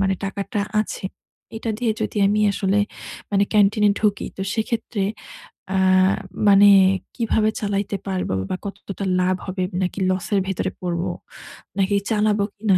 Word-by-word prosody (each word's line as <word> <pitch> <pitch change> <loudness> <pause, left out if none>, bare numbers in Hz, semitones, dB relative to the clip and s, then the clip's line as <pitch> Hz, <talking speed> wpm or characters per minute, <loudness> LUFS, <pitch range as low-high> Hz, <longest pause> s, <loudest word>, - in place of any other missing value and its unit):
মানে 195 -1 +2
টাকাটা 200 +2 -3 0.2
আছে 215 - -5 0.5
এটা 225 0 -3
দিয়ে 235 -3 +1
যদি - - -3
আমি 210 +1 +2
আসলে 195 +1 +1 0.5
মানে 200 0 +3
ক্যান্টিনে 210 0 +4
ঢুকি, 210 -2 +1
তো 195 - -3
সেক্ষেত্রে 220 -2 -2 0.7
আ - - +2 0.7
মানে 200 +1 +7 0.5
কিভাবে 220 -2 +1
চালাইতে 200 -1 -1
পারবো 185 - -2 0.2
বা - - -1
কতটা 200 0 -6 0.2
লাভ 185 +1 +2
হবে 185 -1 -3 0.2
নাকি 180 +2 -3
লস 185 0 -1
এর 200 - +4
ভেতরে 190 0 -2
পড়বো? 175 0 -2 0.7
নাকি 195 +1 +2
চালাবো 210 -1 +2
কিনা? 205 -3 +2
200 Hz, 140 wpm, -22 LUFS, 190-210 Hz, 0.7 s, মানে